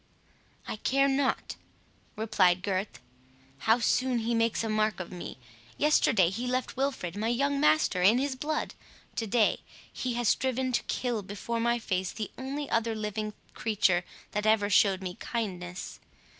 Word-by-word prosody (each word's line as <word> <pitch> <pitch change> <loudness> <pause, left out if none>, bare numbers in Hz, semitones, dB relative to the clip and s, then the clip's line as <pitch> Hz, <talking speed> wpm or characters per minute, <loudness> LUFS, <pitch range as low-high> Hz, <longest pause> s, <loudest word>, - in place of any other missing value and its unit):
"I - - -4
care 275 +5 +2
not," 270 -1 0 0.6
replied 190 -5 +2
Gurth, 190 - -2 0.7
"how 225 - +7
soon 250 +1 +1
he 230 +1 -1
makes 230 0 +1
a 225 - -2
mark 215 -3 +1
of 185 - -6
me. 180 -6 -7 0.4
Yesterday 220 - +4
he 235 +6 -3
left 255 +1 -1
Wilfred, 260 -10 -2
my 215 +2 -1
young 280 +4 +1
master, 300 -10 +3
in 205 +6 +6
his 270 0 0
blood. 300 +4 -2 0.4
To 225 - -1
day 215 +1 +3 0.3
he 250 -2 -2
has 240 -1 0
striven 260 0 +1
to 245 - +1
kill 240 -4 -1
before 205 +4 -4
my 235 +1 +2
face 190 -5 -2
the 215 -2 -5
only 275 +2 -4
other 230 0 0
living 215 0 -3 0.2
creature 200 -5 +2 0.3
that 210 +1 -1
ever 210 -1 +3
showed 190 -1 +4
me 180 -1 -5
kindness. 185 -6 -4
225 Hz, 155 wpm, -29 LUFS, 200-255 Hz, 0.7 s, how